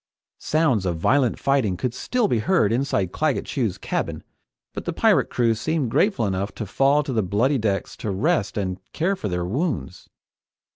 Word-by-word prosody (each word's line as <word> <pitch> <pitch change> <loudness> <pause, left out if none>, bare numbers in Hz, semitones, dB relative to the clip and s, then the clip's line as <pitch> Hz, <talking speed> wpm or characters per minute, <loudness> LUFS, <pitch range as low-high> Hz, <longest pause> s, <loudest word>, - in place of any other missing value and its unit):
Sounds 145 - +1
of 85 -2 -1
violent 130 +8 +2
fighting 130 -10 +1
could 125 +3 -2
still 240 - 0
be 120 - +1
heard 110 - +2
inside 115 -8 0
Claggett 155 +2 0
Chew's 115 -10 -2
cabin, - - -3 0.5
but - - -6
the - - -2
pirate - - +3
crew 115 -2 +2
seemed 135 +2 -1
grateful 195 - +2
enough 100 +1 -2
to 110 - -4
fall 135 +8 +2
to 135 -2 -4
the 110 - +2
bloody 115 +9 +1
decks 100 -3 -1
to 110 - -4
rest 115 - 0
and 95 -2 -2
care 185 +5 0
for 110 - -4
their 90 -1 -2
wounds. 115 - -3
120 Hz, 180 wpm, -23 LUFS, 100-145 Hz, 0.5 s, pirate